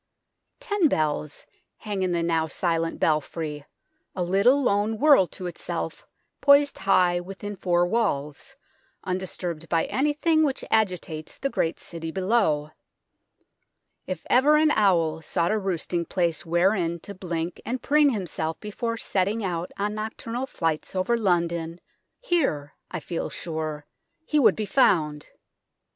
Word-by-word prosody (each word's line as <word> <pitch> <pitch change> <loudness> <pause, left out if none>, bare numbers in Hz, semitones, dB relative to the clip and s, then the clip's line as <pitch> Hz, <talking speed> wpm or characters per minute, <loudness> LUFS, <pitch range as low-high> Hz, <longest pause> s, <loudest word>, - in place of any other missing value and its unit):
Ten 410 -5 +2
bells 150 - -1 0.3
hang 205 -3 -4
in 185 -1 0
the 170 -1 0
now 165 -1 +1
silent 165 0 -1
belfry, 150 -1 -1 0.5
a 180 - -1
little 200 +10 +3
lone 210 -1 +1
world 280 - +5
to 185 - -7
itself 175 -1 -5 0.3
poised 285 0 +5
high 180 -2 +3
within 195 +3 -7
four 175 -2 +2
walls, 175 - -2 0.5
undisturbed 180 -3 -4
by 165 -1 +2
anything 300 +3 +1
which 275 -3 -1
agitates 180 -7 -1
the 275 - -2
great 165 - -1
city 165 -1 -7
below. 185 -5 +1 1.4
If 185 -3 -5
ever 285 +5 +5
an 310 0 +4
owl 170 - +2
sought 170 +3 0
a 215 - +1
roosting 175 -3 -2
place 170 -3 -1
wherein 170 0 +1
to 200 - -8
blink 175 -2 -4
and 255 +2 -4
preen 295 0 +4
himself 170 - -3
before 230 +2 -4
setting 205 +1 0
out 175 -2 -3
on 205 +1 -1
nocturnal 230 +4 -4
flights 165 -5 -2
over 185 +6 +1
London, 170 -5 0 0.4
here, 265 - 0 0.2
I 180 - -4
feel 165 +2 -4
sure, 155 -3 -5 0.4
he 300 - +2
would 270 - +5
be 215 - -2
found. 155 - +2
185 Hz, 135 wpm, -25 LUFS, 165-220 Hz, 1.4 s, world